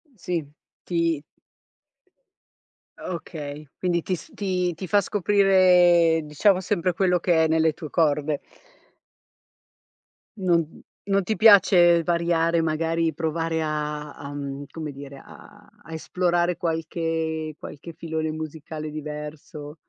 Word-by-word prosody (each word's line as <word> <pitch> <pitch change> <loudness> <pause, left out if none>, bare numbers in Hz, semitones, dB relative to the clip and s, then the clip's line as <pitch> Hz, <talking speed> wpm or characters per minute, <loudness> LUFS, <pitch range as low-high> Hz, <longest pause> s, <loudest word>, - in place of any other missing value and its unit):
Sì, 175 -5 -3 0.4
ti 165 -4 0 1.8
Okay, 150 -4 -7
quindi 175 -2 0
ti 185 - -2
s - - -13
ti 180 -3 -1
ti 185 +3 -7
fa 205 +5 +3
scoprire, 180 -4 +4
diciamo 180 +6 +2
sempre 180 -2 0
quello 180 -1 +2
che 165 -2 +3
è - - +3
nelle 160 -1 +2
tue 155 -1 -9
corde. 150 -2 +1 2.0
Non 170 -4 0 0.3
non 195 -1 +2
ti 215 +4 -2
piace 185 -5 +6
variare 170 -1 +1
magari, 165 +1 0
provare 160 +1 -2
a 150 -1 -3
a 145 0 -9
mhmm, 140 0 -5
come 155 -2 -6
dire, 140 0 -10
a 210 0 -16 0.2
a 165 - -10
esplorare 175 +1 0
qualche 160 -2 -2
qualche 160 +3 -10
filone 160 -1 -3
musicale 155 0 -6
diverso? 150 0 -7
165 Hz, 115 wpm, -24 LUFS, 155-175 Hz, 2.0 s, piace